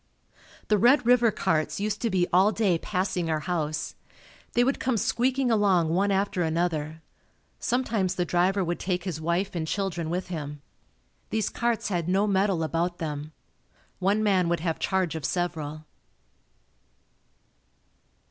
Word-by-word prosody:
The 210 -1 +3
Red 245 +4 +5
River 240 -1 +5
carts 160 -6 0
used 210 0 -2
to 230 - +1
be 185 -3 +2
all 190 +4 +5
day 195 -7 +1
passing 185 -3 -1
our 155 -1 0
house. 155 -3 -2 0.6
They 240 - +4
would 270 +3 0
come 255 -3 0
squeaking 255 +3 +1
along 195 -7 +3
one 190 +5 +2
after 195 -1 0
another. 160 -1 -1 0.6
Sometimes 220 -7 0
the 180 - 0
driver 185 +3 +2
would 175 0 -2
take 180 -2 -2
his 170 -5 -4
wife 170 +4 -1
and 165 -3 -3
children 175 -4 -2
with 180 +2 -3
him. 150 -4 -6 0.7
These 220 -1 0
carts 235 -2 -1
had 175 -3 -1
no 195 +3 +3
metal 195 -4 +1
about 170 +2 -1
them. 150 -1 -5 0.7
One 200 +3 +2
man 185 -4 +2
would 170 -2 0
have 165 -2 -2
charge 185 -5 0
of 160 -2 -5
several. 155 -3 -3
180 Hz, 150 wpm, -26 LUFS, 165-205 Hz, 0.7 s, Red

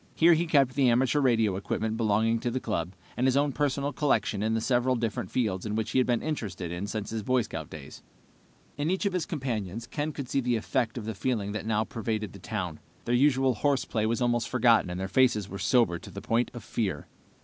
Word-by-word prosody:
Here 170 +1 +6
he 165 +1 +1
kept 140 -5 +3
the 135 -2 +3
amateur 130 +4 +3
radio 115 -7 +3
equipment 110 +3 -2
belonging 110 +1 +2
to 120 - -1
the 125 +2 -2
club, 90 -7 -3 0.2
and 125 - +1
his 130 +1 +3
own 145 0 +2
personal 140 0 -1
collections 110 -8 +1
in 110 +1 +1
the - - +1
several 125 +2 +2
different 115 -3 -2
fields 105 -7 -1
in 105 -1 -3
which 110 0 -2
he - - +3
had 130 - +2
been 120 -2 +1
interested 95 - -4 0.2
since 110 -2 -4
his 110 -1 -2
Boy 125 +3 +2
Scout 80 -7 -6
days. 75 -3 -10 0.8
In 145 +2 0
each 190 +3 0
of 200 - +1
his 180 -3 -1
companions, 115 - -3
Ken 150 +3 -3
could 140 -3 -6
see 135 - 0
the 125 -1 +1
effect 115 +1 -1
of 115 - -5
the 110 - -3
feeling 105 -2 -1
that 110 +1 -4
now 110 -1 +2
pervaded 110 -2 -3
the - - -11
town. - - -4 0.3
Their 120 - 0
usual 130 0 +4
horseplay 120 -3 0
was 115 +2 0
almost 120 -1 +1
forgotten, 115 -5 +4
and 90 +1 -4
their 95 - -2
faces 120 -3 +3
were 100 -1 -7
sober 90 -3 +2
to - - -11
the - - -7
point 115 +2 0
of 120 - -7
fear. 95 -12 -2
115 Hz, 225 wpm, -28 LUFS, 110-130 Hz, 0.8 s, Here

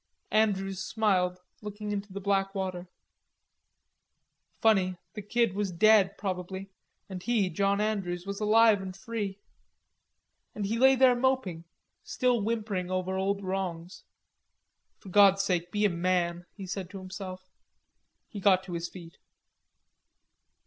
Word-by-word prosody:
Andrews 195 -3 +1
smiled, 185 -4 +1 0.2
looking 210 0 -6
into 205 0 -4
the 200 - -5
black 195 0 0
water. 185 -2 -3 1.7
Funny, 190 -5 +3 0.2
the 210 - -6
Kid 230 0 +1
was 200 -1 -2
dead, 200 +1 +4
probably, 190 0 -5 0.4
and 185 -2 -7
he, 210 -4 +1
John 200 +4 +1
Andrews, 195 -5 -2
was 200 +1 -5
alive 215 -1 +5
and 190 0 -7
free. 210 -4 -4 1.2
And 210 - -3
he 225 +3 -1
lay 265 +1 +6
there 255 -1 +5
moping, 240 -10 0 0.4
still 250 -3 +1
whimpering 210 -4 -2
over 185 0 -2
old 195 +1 -1
wrongs. 185 -2 -4 0.9
"For 195 - -13
God's 195 0 +5
sake 175 -2 -1
be 210 0 +1
a - - +4
man!" 175 0 -1
he 195 - -7
said 185 -1 -5
to 195 - -8
himself. 185 0 -8 0.8
He 210 - -8
got 190 -1 +4
to 185 - -8
his 170 0 -3
feet. 170 -3 -12
195 Hz, 135 wpm, -29 LUFS, 185-210 Hz, 1.7 s, lay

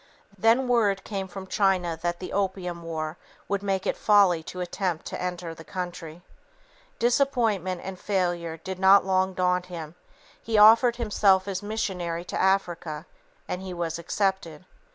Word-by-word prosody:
Then 225 +6 +3
word 210 -5 +2
came 195 -3 -4
from 190 +1 -8
China 185 -3 +1
that 175 0 -1
the 185 - -7
"opium 185 -3 -2
war" 160 -1 -4 0.3
would 200 -1 -1
make 195 -2 -1
it - - 0
folly 200 -6 +4
to 180 +3 -8
attempt 180 -1 -3
to - - -5
enter 180 -2 -4
the 165 - -12
country. 175 -2 -6 0.7
Disappointment 230 -8 +1
and 190 -1 -7
failure 175 -4 -1
did 185 +3 -7
not 190 +1 +6
long 190 0 +1
daunt 180 0 +1
him; 165 -3 -7 0.5
he 220 -1 -1
offered 225 +3 +7
himself 205 -4 +2
as 190 -2 -3
missionary 180 -5 -3
to - - -3
Africa, 175 -5 0 0.4
and 180 - -4
he 185 -1 -6
was 170 -1 -3
accepted. 185 -2 -2
185 Hz, 155 wpm, -26 LUFS, 175-200 Hz, 0.7 s, offered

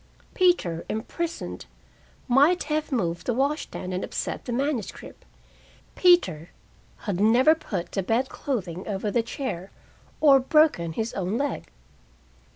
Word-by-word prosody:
Peter, 350 - +2
imprisoned, 330 +10 -4 0.6
might 285 +8 +4
have 305 0 -2
moved 175 -9 -1
the 245 - +1
wash 280 +4 +1
stand 185 0 -6
and 185 - -2
upset - - -4
the - - -4
manuscript 260 -3 -3 0.7
Peter 185 - +3 0.6
had 195 -5 -2
never 245 +8 +5
put 195 - -5
the 195 - -1
bed 230 +7 0
clothing 190 - -4
over 205 0 -2
the 235 - +2
chair, 225 -6 -5 0.5
or 280 -3 +7
broken 265 - +3
his 225 +6 -3
own 195 +3 -2
leg. 280 +1 -2
240 Hz, 130 wpm, -25 LUFS, 190-290 Hz, 0.7 s, or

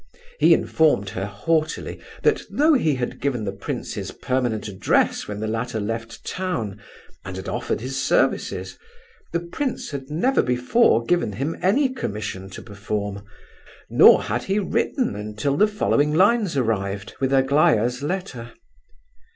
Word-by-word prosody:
He - - +7
informed 150 -11 +2
her 95 +1 -4
haughtily 155 +10 -1 0.2
that - - +3
though 310 +2 +3
he 160 - +2
had 125 -1 -4
given 130 -5 -1
the 100 - -2
prince 100 0 -5
his - - -5
permanent 125 -5 -2
address 95 -2 +1
when 105 0 -5
the 110 - -2
latter 115 +1 -2
left 115 +2 -5
town, 115 - -3 0.4
and 95 0 -7
had 95 - -7
offered - - -2
his 135 +2 -3
services, - - 0 0.5
the 170 - 0
prince 235 +11 -4
had 135 -2 -6
never 215 - +2
before 125 - +3
given 175 -11 +1
him 140 +10 -2
any 260 +10 +3
commission 105 - -5
to 95 - -9
perform, 100 -1 -4 0.7
nor - - +7
had 120 +3 -2
he 195 +1 0
written 225 +5 0
until 105 +6 -2
the 210 +8 +4
following 150 -8 +1
lines 200 -2 +3
arrived, 100 -5 -1
with 135 -1 0
Aglaya's 135 -3 +3
letter. 145 -8 -4
125 Hz, 145 wpm, -23 LUFS, 105-170 Hz, 0.7 s, He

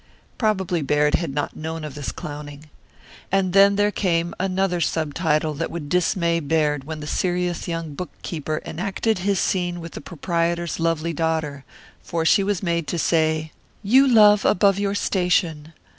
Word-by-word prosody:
Probably 190 -6 0
Baird 150 +1 +2
had 170 -5 0
not 145 +1 -3
known 160 0 -5
of 150 -3 -6
this 145 -2 -4
clowning. 145 0 -8 0.7
And 190 -2 +1
there 200 +1 +5
came 170 -4 0
another 185 -1 0
subtitle 155 -1 0
that 160 +3 -3
would 160 -4 -6
dismay 170 -1 +1
Baird 150 -2 0
when 155 0 -6
the - - -6
serious 175 +2 -1
young 165 -3 -4
bookkeeper 155 -1 -5
enacted 195 +5 -1
his 195 0 0
scene 175 -2 -1
with 165 0 -8
the - - -8
proprietor's 170 +1 -2
lovely 165 0 0
daughter, 155 -3 -2 0.4
for 165 -1 -3
she 195 +4 +4
was 200 -2 -1
made 170 -3 -1
to 175 - -2
say: 160 -1 +1 0.3
"You 260 +7 +5
love 210 -4 +6
above 200 +1 +3
your 200 0 -1
station. 180 -6 0
170 Hz, 155 wpm, -22 LUFS, 155-185 Hz, 0.7 s, love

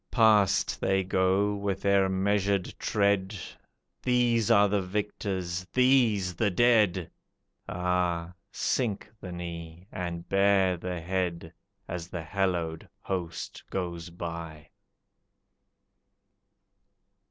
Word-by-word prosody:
Past 110 -5 +3
they 95 0 +2
go 95 +2 +2
with 100 -1 -3
their 100 -1 +3
measured 100 0 +1
tread, 100 -1 +1 0.6
These 120 -3 +2
are 105 -3 +6
the 100 0 +1
victors, 95 -2 -3
these 120 -8 +3
the 105 +5 +1
dead! 105 -4 +3 0.6
Ah, 90 -1 -1 0.2
sink 115 -6 -1
the 90 - -7
knee 85 0 -7
and 85 -1 -5
bare 95 -1 +3
the 90 0 -5
head 85 -2 -2 0.3
As 85 -1 -5
the 85 -2 -5
hallowed 85 -3 -2
host 90 -3 -4
goes 85 -2 -4
by! 85 -2 -7
95 Hz, 95 wpm, -28 LUFS, 85-100 Hz, 0.6 s, are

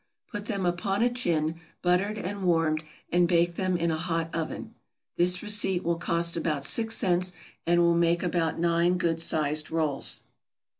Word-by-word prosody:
Put 205 0 -6
them 200 -5 -2
upon 195 +4 0
a 245 - +2
tin, 165 -9 +1 0.2
buttered 185 +4 +1
and 200 +1 -5
warmed, 165 -3 +1 0.3
and 175 0 +3
bake 170 0 +2
them 185 0 -1
in 170 0 0
a 160 - -1
hot 165 -1 -3
oven. 165 -1 -5 0.4
This 180 +1 +2
receipt 205 -3 +1
will 170 0 0
cost 170 0 +1
about 155 -4 -2
six 225 - +1
cents, 180 -2 +1 0.3
and 175 0 +4
will 170 0 +4
make 170 +1 +1
about 170 -2 -1
nine 170 +1 +2
good 165 -2 0
sized 155 -1 +1
rolls. 155 -4 -1
170 Hz, 165 wpm, -27 LUFS, 165-185 Hz, 0.4 s, and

